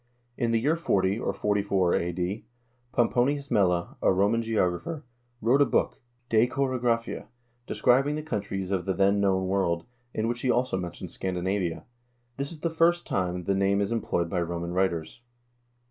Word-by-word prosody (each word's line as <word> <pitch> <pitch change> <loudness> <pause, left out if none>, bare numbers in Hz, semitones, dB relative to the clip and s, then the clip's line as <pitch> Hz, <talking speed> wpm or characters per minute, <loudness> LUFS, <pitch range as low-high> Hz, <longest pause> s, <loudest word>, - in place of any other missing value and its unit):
In 120 -2 0
the 115 0 +2
year 145 +8 +2
40, 100 - +1
or - - -1
44, 100 -3 +1
a.d., 90 +5 -2 0.5
Pomponius 140 +4 +1
Mela, 90 -6 +1
a - - +4
Roman 100 +5 +2
geographer, 115 - -1 0.4
wrote 125 +5 +4
a - - +7
book, - - 0 0.3
"De 115 +1 +4
Choro 130 0 -1
graphia," 115 -1 -1 0.4
describing 135 +4 +3
the 155 - -4
countries 100 -9 -3
of 95 -2 -1
the 95 - 0
then 100 +2 +3
known 95 -1 +2
world, 95 -3 0 0.3
in 110 -1 -1
which 120 0 -2
he 130 - 0
also 125 -2 +2
mentions 90 -1 -5
Scandinavia. 95 -1 -2 0.5
This 140 +2 -2
is 160 -3 -9
the 170 - -1
first 170 +2 +3
time 90 -1 -1
the 100 - +1
name 100 +1 +2
is 100 +1 0
employed 100 -7 0
by 90 +1 -1
Roman 85 0 -3
writers. 90 +1 -1
100 Hz, 165 wpm, -27 LUFS, 95-125 Hz, 0.5 s, a